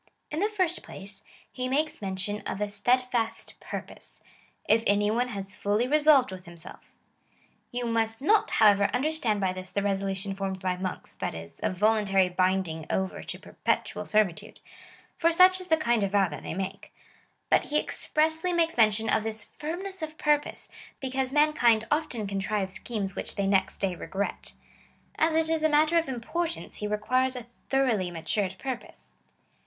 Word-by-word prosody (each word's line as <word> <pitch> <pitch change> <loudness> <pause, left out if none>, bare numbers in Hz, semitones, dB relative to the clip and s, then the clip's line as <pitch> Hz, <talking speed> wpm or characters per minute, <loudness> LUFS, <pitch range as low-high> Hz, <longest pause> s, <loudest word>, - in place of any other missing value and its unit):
In 305 - -2
the 415 +3 +2
first 370 -5 0
place, 195 +1 -8 0.3
he 255 0 -3
makes 300 +1 0
mention 195 +1 -3
of - - -3
a 210 0 -1
steadfast 240 +2 0
purpose - - -8 0.2
— - - -36
If 225 +1 +4
any 205 +1 +3
one 245 +3 +1
has 195 -5 -5
fully 205 +5 0
resolved 295 -4 +5
with 185 -1 -9
himself 170 -1 -11 0.8
You 245 0 -2
must 225 -1 0
not, 420 +10 +3
how 220 -2 +6
ever, 200 0 +3
understand 250 -6 0
by 190 -2 0
this 185 0 -6
the 200 - -1
resolution 195 0 -1
formed 195 -1 -3
by 185 -1 -1
monks 185 0 -5
— - - -37
that - - -2
is, 80 0 -9
a - - +1
voluntary 195 -1 +3
binding 180 -3 0
over 190 0 -1
to - - -6
pei - - -14
petual - - 0
sei'vitude 210 -5 0 0.3
— - - -25
for 335 0 +4
such 370 +2 +6
is 365 - -7
the 320 - +4
kind 240 -7 +1
of 200 0 -1
vow 200 -2 +4
that 150 - -7
they - - -5
make; 195 +2 -5 0.6
but - - +4
he 300 - 0
expressly 320 +4 0
makes 330 -3 +1
mention 220 -1 +3
of 220 - +2
this 220 0 -3
firmness 370 +5 -6
of 310 0 -5
purpose, 295 -1 0 0.3
because 265 -1 -2
man 300 +1 +4
kind 230 -6 +4
often 295 -8 0
contrive 195 0 -2
schemes 200 -1 -4
which - - -4
they 200 - 0
next 195 0 +2
day 195 -2 -1
regret. 195 +3 -4 0.7
As 320 0 +3
it 320 0 +3
is 320 -1 0
a 315 - +3
matter 310 +2 +4
of 325 - -3
importance, 315 +7 -3
he 210 - -3
requires 255 +5 +1
a 245 -2 -6 0.2
thoroughly 240 -9 +2
matured 185 +3 -2
purpose. 260 -3 -7
220 Hz, 180 wpm, -28 LUFS, 195-300 Hz, 0.8 s, how